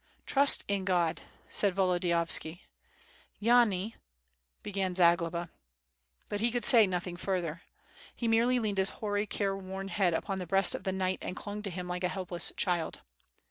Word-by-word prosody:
..." - - -40
"Trust 280 0 +4
in 200 -1 -1
God!" 175 -3 0 0.3
said 200 -3 +1
Volodiyovski. 175 -2 0 0.8
"Yani 225 -3 +3 0.4
..." 60 0 -45
began 195 -3 -2
Zagloba. 170 -1 +2 0.8
But 205 - -3
he 235 - +2
could 240 0 -1
say 225 -4 +7
nothing 180 -1 -3
further. 175 -3 -3 0.5
He 235 - -2
merely 235 +3 +3
leaned 210 -4 -1
his 190 +1 +3
hoary, 205 -1 -2
careworn 195 -1 -3
head 185 -5 +1
upon 195 +2 -3
the 180 - -6
breast 195 +1 +3
of - - -6
the 190 - 0
knight 185 0 -1
and 180 - -5
clung 205 0 -6
to 205 - -5
him 180 0 -6
like 180 0 -4
a - - +3
helpless 180 -2 -2
child. 175 -4 -1
190 Hz, 165 wpm, -30 LUFS, 175-205 Hz, 0.8 s, say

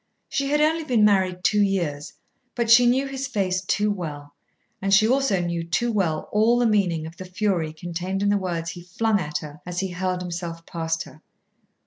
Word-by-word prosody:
She 275 - -1
had 295 +1 +2
only 320 +2 +2
been 240 -8 +3
married 185 -3 +2
two 210 +2 +3
years, 170 -8 -1 0.4
but 235 -2 0
she 240 +1 +8
knew 260 +3 +3
his 270 0 -4
face 185 -6 -1
too 210 +2 +1
well; 145 -7 -6 0.5
and 195 0 -1
she 215 +3 +6
also 260 -6 +2
knew 170 -1 -2
too 170 +9 0
well 175 -8 0
all 220 +3 +3
the 245 - +2
meaning 185 -8 +1
of 160 +2 -10
the 185 - -7
fury 180 -4 -1
contained 175 +4 -4
in 205 - +2
the 205 - +3
words 170 -4 -3
he 175 - -9
flung 205 +4 0
at 150 -3 -3
her 150 0 -10
as 180 +1 -4
he 190 - -2
hurled 180 0 -2
himself 170 -1 -6
past 165 -2 -2
her. 155 - -15
185 Hz, 200 wpm, -24 LUFS, 170-215 Hz, 0.5 s, she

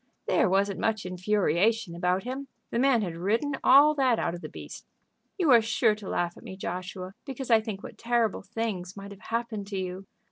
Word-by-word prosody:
"There - - +3
wasn't 195 +1 +1
much 220 -3 0
infuriation 185 +2 +1
about 180 +2 0
him. 265 +3 -5 0.2
The 235 - 0
man 255 -4 +4
had 175 -4 -4
ridden 220 - 0
all 285 +3 +7
that 260 -5 +2
out 170 - -1
of 175 - -7
the - - -7
beast." - - -10 0.5
"You 340 -7 +3
are 235 -2 +8
sure 225 0 +2
to 210 -2 -8
laugh 175 0 -1
at - - -14
me, 190 - -8
Joshua, 185 +1 -5
because 265 -2 -5
I 225 -1 +6
think 215 -3 -6
what - - -10
terrible 230 -2 +1
things 195 -3 -4
might 200 0 -8
have 200 -1 -12
happened 225 -3 -3
to 200 -1 -4
you. 185 +1 -5
210 Hz, 205 wpm, -28 LUFS, 185-235 Hz, 0.5 s, are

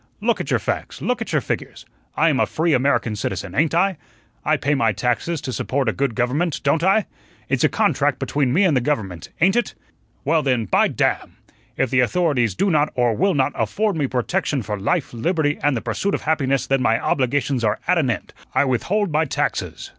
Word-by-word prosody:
Look - - 0
at - - -6
your - - +3
facts, - - -4
look - - -1
at - - -4
your - - +2
figures. - - -5 0.3
I 165 +2 +4
am 140 -4 +1
a - - +2
free 160 0 0
American 125 -4 +1
citizen, 100 -2 -4
ain't 155 +5 +1
I? 190 0 +2 0.5
I 155 0 +2
pay 145 0 0
my 115 -6 +2
taxes 125 - -1
to 130 - -5
support 135 +1 -1
a 110 - +2
good 135 -4 -1
government, 140 +7 0
don't 145 +4 +2
I? 195 +3 +3 0.4
It's - - +1
a - - +5
contract - - +1
between 140 -4 0
me 180 +10 +3
and 175 -7 +3
the 125 - +2
government, 105 - -3
ain't 190 +3 +4
it? 240 - 0 0.5
Well, 165 -1 +3
then, 125 -5 0
by - - +3
damn! - - -1 0.4
if 135 - 0
the 130 - +3
authorities 125 - +1
do 195 - +1
not 150 -1 +2
or 120 -2 +2
will 195 - +1
not 135 -2 +2
afford 195 - -1
me 145 -4 0
protection 135 +2 -1
for 105 0 -4
life, 150 - -1
liberty, 145 +4 0
and 145 -4 +2
the - - -3
pursuit 125 - -1
of - - -5
happiness, 135 -4 +1
then 135 -1 +1
my 115 -2 +2
obligations 130 -1 0
are 105 -2 +1
at 180 - +3
an 135 -5 +1
end; 120 - -3 0.2
I - - +4
withhold 180 - 0
my 155 +2 +2
taxes. 135 - -3
140 Hz, 215 wpm, -21 LUFS, 120-165 Hz, 0.5 s, a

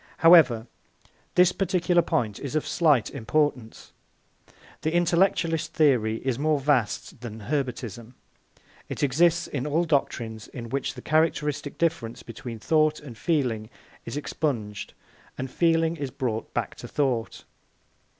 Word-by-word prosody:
However, 155 -10 +6 0.7
this 180 0 +6
particular 180 -2 +2
point 110 -10 -1
is 140 +1 -5
of 155 - 0
slight 150 - +2
Importance. 130 -1 -1 0.9
The 155 - 0
intellectualist 170 -2 +1
theory 125 -8 +3
is 130 -2 0
more 155 0 +2
vast 130 -4 0
than 110 -2 -7
Herbartism; 120 -2 -4 0.7
it - - -4
exists 170 +5 +3
in 140 0 -4
all 160 +4 +2
doctrines 115 -8 -1
in 120 -3 -8
which 135 +3 -2
the - - -10
characteristic 150 -2 0
difference 160 -9 -1
between 115 0 -8
thought 155 +6 +2
and 135 -6 -10
feeling 120 -8 -1 0.3
is - - -5
expunged 115 -9 -3 0.4
and 130 0 -5
feeling 165 0 +2
is 140 -3 -3
brought 120 -4 -3
back - - -2
to - - -8
thought. 130 -6 -1
140 Hz, 130 wpm, -26 LUFS, 115-160 Hz, 0.9 s, However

